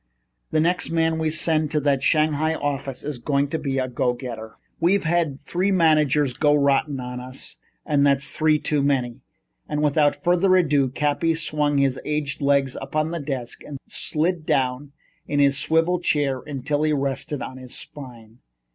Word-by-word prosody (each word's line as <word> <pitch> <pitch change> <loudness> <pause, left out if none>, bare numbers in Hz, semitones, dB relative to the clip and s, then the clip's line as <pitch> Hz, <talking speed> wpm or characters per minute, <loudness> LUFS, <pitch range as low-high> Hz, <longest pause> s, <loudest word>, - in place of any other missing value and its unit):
The 155 - +1
next 175 +3 +1
man 165 -1 +1
we 160 -1 +1
send 155 0 +1
out 150 - -6
to 150 - +2
that 140 -2 +1
Shanghai 155 +1 +2
office 140 -3 -3
is 145 -4 -4
going 140 +2 0
to 160 - -2
be 135 -2 -2
a 130 -1 0
go 125 0 0
getter. 115 -3 -8 0.2
We've 185 +4 +2
had 160 -4 0
three 180 +6 -1
managers 155 -6 +3
go 150 +3 +3
rotten 140 0 +1
on 125 0 -5
us 130 +1 -8 0.3
and 145 -3 +2
that's 140 0 +2
three 155 -1 +2
too 150 -1 0
many." 130 -4 0 0.5
And 150 0 -1
without 145 0 +3
further 180 +1 +3
ado, 145 -7 +3
Cappy 150 +5 0
swung 150 -2 0
his 135 -2 +1
aged 150 -2 -3
legs 140 -2 +2
up 135 +2 -8
on 155 +1 +1
to 170 - -2
his 145 - -8
desk 130 -4 -4
and 145 - -7
slid 165 +2 -1
down 135 0 -1 0.4
in 145 - 0
his 140 -1 +3
swivel 165 +4 +2
chair 145 -6 0
until 145 +1 -2
he 155 0 +2
rested 140 -1 -2
on 130 - -7
his 130 -1 -9
spine. 120 -5 -10
145 Hz, 180 wpm, -23 LUFS, 135-155 Hz, 0.5 s, managers